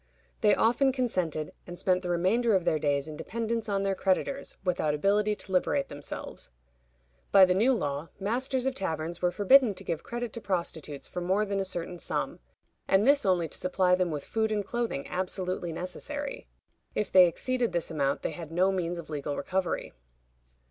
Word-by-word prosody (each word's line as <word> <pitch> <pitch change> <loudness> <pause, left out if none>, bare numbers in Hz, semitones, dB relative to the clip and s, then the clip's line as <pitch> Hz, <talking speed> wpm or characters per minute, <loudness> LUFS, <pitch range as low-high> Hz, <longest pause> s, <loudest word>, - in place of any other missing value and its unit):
They 210 -3 +4
often 245 +4 +3
consented, 185 - -1
and 175 0 -7
spent 185 0 +2
the 180 - -4
remainder 200 +6 +2
of 185 -2 +1
their 155 - +2
days 145 -1 0
in 155 - -7
dependence 230 +3 -3
on 200 -1 0
their 195 0 +1
creditors, 200 +9 -1
without 170 -5 +1
ability 205 +6 +2
to 195 - -10
liberate 275 +9 +1
themselves. 145 0 -6 0.8
By 195 -1 +9
the 180 - +2
new 220 +8 +4
law, 145 - -2
masters 250 +5 -1
of 265 - +1
taverns 165 -5 -3
were 180 - +3
forbidden 210 +4 +5
to - - -9
give 165 -3 -3
credit 240 -1 -5
to 230 - -6
prostitutes 165 -7 -3
for 180 - -5
more 190 +4 +1
than 200 -1 -1
a 195 - -1
certain 175 -1 -4
sum, - - -2 0.5
and 195 +2 +4
this 280 -5 +4
only 175 -3 +2
to - - -5
supply 180 0 +2
them 180 -1 +2
with 150 -3 -4
food 220 -1 0
and 205 -2 0
clothing 235 -11 -2
absolutely 185 -1 -3
necessary. 275 - -5 0.5
If 210 - -1
they 185 -1 +8
exceeded 250 +7 -1
this 170 -1 -2
amount 140 -3 0
they - - -1
had 165 -2 -8
no 185 +3 +3
means 175 -2 -2
of 170 -2 -8
legal 145 -1 -3
recovery. 185 +5 -2
185 Hz, 185 wpm, -29 LUFS, 170-220 Hz, 0.8 s, By